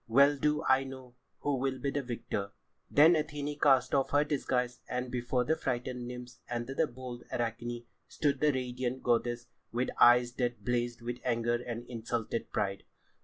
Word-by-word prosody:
Well 140 +5 +6
do 150 +2 +1
I 135 -2 +4
know 130 -2 -9 0.3
who 145 -2 0
will 135 0 -1
be 140 +1 -2
the 145 - -1
victor." 115 -5 -4 0.4
Then 155 +4 +7
Athené 150 -2 -2
cast 135 -3 +4
off 135 -1 +2
her 145 +1 +4
disguise, 125 -4 -1
and 125 0 -2
before 125 0 0
the 160 +5 +1
frightened 125 -2 -3
nymphs 125 0 -8
and 120 -1 -2
the 135 +5 0
bold 125 -1 -8
Arachne 120 0 -3 0.2
stood 140 -3 0
the 150 +1 +4
radiant 125 -1 -3
goddess 120 0 +1 0.3
with 120 +2 0
eyes 120 0 +6
that 120 -5 -2
blazed 120 -1 -1
with 120 +1 -4
anger 120 -1 +1
and 120 0 -5
insulted 115 -1 -3
pride. 100 -1 -1
125 Hz, 170 wpm, -31 LUFS, 120-135 Hz, 0.4 s, Then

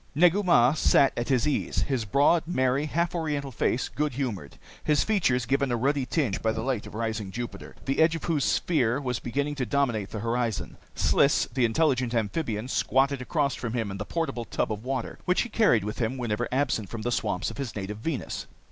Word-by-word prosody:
Negu 180 +5 +5
Mah 145 -9 +5
sat 140 -3 +4
at 120 +2 -3
his 130 +2 +2
ease, 150 - 0
his 130 -6 -1
broad, 145 - +3
merry, 130 -2 +1
half 170 +3 0
Oriental 150 -5 -2
face 125 +1 0
good 150 -2 -2
humored, 115 - -4 0.3
his 150 -2 +3
features 135 - +1
given 135 +1 +1
a - - +2
ruddy 135 +2 0
tinge 125 -7 0
by 110 - +1
the 110 0 -3
light 125 -4 -2
of - - -10
rising 110 -3 -2
Jupiter, 120 +4 -7
the 135 - -1
edge 160 +1 +4
of 165 - -6
whose 155 -5 0
sphere 130 -7 +1
was 125 -4 -2
beginning 140 +4 -2
to 135 -3 -2
dominate 120 -8 0
the 110 - -5
horizon. 115 -1 -2 0.2
Sliss, 140 - +3
the 130 -1 +2
intelligent 125 -1 +1
amphibian, 115 0 -1
squatted 135 +1 +1
across 140 0 0
from 120 -3 -4
him 115 -5 -2
in 95 - -5
the 105 - -3
portable 160 -7 -2
tub - - -2
of 105 0 -4
water 130 -2 -3
which 180 0 +2
he 240 - -3
carried 210 - +3
with 105 +1 -5
him 120 +2 -1
whenever 120 -1 -1
absent 130 -6 0
from 115 -2 -6
the 120 - -1
swamps 100 -6 -1
of - - -10
his 135 -5 -4
native 105 +1 -5
Venus. 140 +2 -4
130 Hz, 210 wpm, -27 LUFS, 115-145 Hz, 0.3 s, Negu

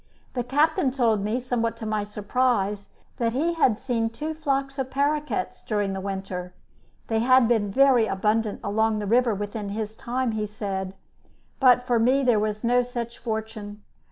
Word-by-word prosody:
The 245 - -1
captain 295 +5 +2
told 230 -6 +1
me, 215 +4 0
somewhat 240 -2 -1
to 220 - -7
my 215 -1 -1
surprise, 210 -1 -1 0.3
that 230 -1 0
he 320 +7 +1
had 260 -10 +2
seen 230 -3 -1
two 300 +8 -5
flocks 275 -3 -2
of 260 -1 -2
paroquets 290 +3 -1
during 205 -3 -1
the 190 - -4
winter 190 -2 -5 0.5
(they 225 -1 0
had 255 +1 +5
been 220 -4 +2
very 260 -1 +5
abundant 210 +2 0
along 220 +1 +1
the 210 - -3
river 235 +1 +3
within 205 +1 -4
his 215 +1 -4
time, 250 +1 -2
he 215 -1 -2
said), 195 -2 -4 0.6
but 250 -2 +5
for 240 -2 +2
me 260 +4 +3
there 240 -4 +4
was 215 +1 -2
no 245 +1 +3
such 240 -1 -5
fortune. 220 -2 -5
225 Hz, 170 wpm, -25 LUFS, 210-255 Hz, 0.6 s, had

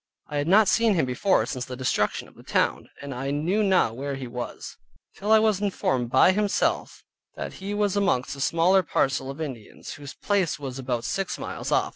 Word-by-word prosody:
I 150 - -3
had 145 +1 -1
not 205 +4 +6
seen 230 -1 +3
him 160 - +2
before, 130 +10 +2
since 125 -2 -4
the 130 - -7
destruction 125 -5 -1
of - - -19
the - - -16
town, - - 0
and 140 -1 -5
I 135 +2 -4
knew 160 +9 0
not 185 - +2
where 140 +2 -4
he 135 -1 -6
was, 120 0 -6 0.4
till 205 +2 -2
I 220 - +8
was 215 -2 +2
informed 130 - 0
by 130 +8 +5
himself, 205 +1 0 0.3
that - - -5
he 200 +2 -3
was 205 -2 +1
amongst 145 -11 +1
a 140 - -7
smaller 175 +6 +3
parcel 135 -5 0
of 135 +3 -7
Indians, 130 -9 -7
whose 145 -1 -10
place 200 -5 0
was 135 -3 -6
about 125 -3 -2
six 195 0 -2
miles - - -5
off. - - +2
145 Hz, 205 wpm, -25 LUFS, 130-195 Hz, 0.4 s, I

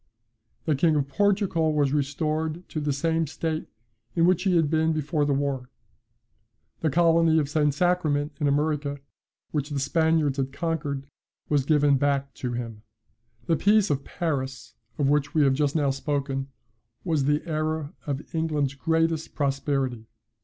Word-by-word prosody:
The 155 - +2
King 155 +3 +3
of 140 -2 +1
Portugal 190 -3 +1
was 145 -2 +2
restored 155 +4 -1
to 155 - -3
the 145 -1 -1
same 160 +3 0
state 160 +2 -3 0.5
in 165 -1 +4
which 180 -1 +3
he 185 -2 +3
had 165 -3 +3
been 160 +1 +2
before 150 0 0
the 145 - 0
war. 135 -2 -2 1.1
The 160 - +1
colony 165 +1 +4
of 150 -3 +2
St. 150 0 +2
Sacrament 155 -2 +1
in 145 - +1
America, 145 0 0 0.5
which 145 -1 -2
the 145 -2 -2
Spaniards 160 0 +2
had 135 -1 -1
conquered, 145 -3 -3 0.4
was 145 -3 +2
given 145 -2 +4
back 140 -1 0
to 125 -2 -4
him. 115 -3 -5 0.6
"The 165 - +2
peace 205 +1 +3
of 140 -1 -1
Paris, 135 -5 -3 0.2
of 145 - +1
which 145 +1 +1
we 155 - +5
have 135 -1 +4
just 145 +1 0
now 145 -3 +2
spoken, 135 -1 -2 0.6
was 155 -6 0
the 150 +3 +1
era 155 -2 -2
of 140 0 -2
England's 155 -4 0
greatest 160 +2 0
prosperity. 135 -4 -1
150 Hz, 155 wpm, -26 LUFS, 140-160 Hz, 1.1 s, we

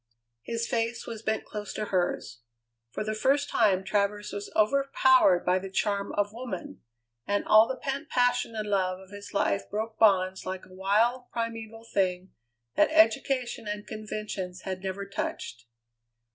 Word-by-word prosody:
His 230 - -3
face 230 -2 -1
was 225 -2 -6
bent 220 -1 -1
close 210 -1 -6
to 215 - -2
hers. 175 -9 -1 0.5
For 170 - -4
the 215 0 -2
first 275 +6 +1
time 195 -4 +3
Travers 205 +1 -1
was 200 0 -5
overpowered 260 -4 +4
by 180 +1 +3
the 195 +1 -7
charm 200 +1 -1
of 205 0 0
woman, 230 -6 -6 0.5
and 205 0 0
all 215 +1 +7
the 260 - -2
pent 275 +3 -4
passion 245 -2 +1
and 215 -1 -3
love 185 -2 0
of 190 0 -15
his 205 0 -9
life 200 -1 0
broke 220 +2 -4
bonds 190 -3 +4
like 185 0 -5
a 185 - -17
wild, 220 +7 +1
primeval 225 -1 -5
thing 185 -4 -1 0.4
that 305 - +4
education 275 -7 +2
and 210 0 -4
conventions 210 -4 -5
had 185 -1 -5
never 195 +1 -4
touched. 120 -10 -5
210 Hz, 160 wpm, -28 LUFS, 190-230 Hz, 0.5 s, all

